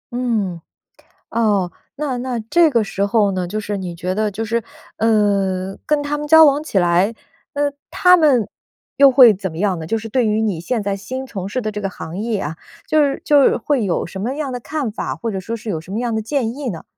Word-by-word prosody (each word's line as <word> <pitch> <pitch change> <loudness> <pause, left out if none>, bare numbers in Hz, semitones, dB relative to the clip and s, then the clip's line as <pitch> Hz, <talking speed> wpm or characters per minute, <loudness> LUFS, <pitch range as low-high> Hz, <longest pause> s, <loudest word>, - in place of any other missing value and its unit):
嗯， 215 -9 -1 0.7
哦。 205 -6 +1 0.3
那 280 -4 -2
那 245 -1 -3
这 340 -1 +5
个 230 -4 +2
时 200 -1 -2
候 205 -1 +2
呢， 185 -1 -2
就 215 +4 -3
是 205 -1 -4
你 180 -3 -5
觉 180 +2 -3
得 215 0 0
就 220 +3 -4
是， 230 +1 -1 0.3
呃， 195 -4 +1
跟 300 -1 +1
他 290 +1 -2
们 295 - -5
交 320 +1 +8
往 290 0 +3
起 205 -11 0
来， 175 +5 +2 0.4
那 285 0 0 0.2
他 360 -1 +5
们 255 - +3 0.5
又 275 -1 +7
会 250 -3 +8
怎 190 -2 -5
么 160 - -9
样 195 -3 +1
呢？ 160 - -6
就 225 +6 -1
是 225 +1 -8
对 250 +1 +1
于 215 0 +1
你 200 -7 -1
现 220 +6 -2
在 200 -1 -2
新 260 +7 -6
从 195 -6 -5
事 250 +5 -3
的 215 - -3
这 210 - -5
个 195 - -2
行 170 +1 -8
业 220 0 -2
啊， 160 -1 -5 0.3
就 310 -1 +3
是 275 -1 -1
就 290 -2 +5
有 - - +3
会 250 -3 0
有 180 - 0
什 190 - -8
么 235 +7 -2
样 285 -2 -4
的 245 - -4
看 275 -3 -3
法， - - -4
或 230 - -4
者 195 - -3
说 225 +5 -5
是 225 0 -8
有 165 -6 -2
什 175 +4 -12
么 220 - -1
样 240 -2 -1
的 220 - -2
建 240 -2 -1
议 285 -4 -3
呢？ 165 - -8
220 Hz, 260 characters per minute, -19 LUFS, 195-260 Hz, 0.7 s, 交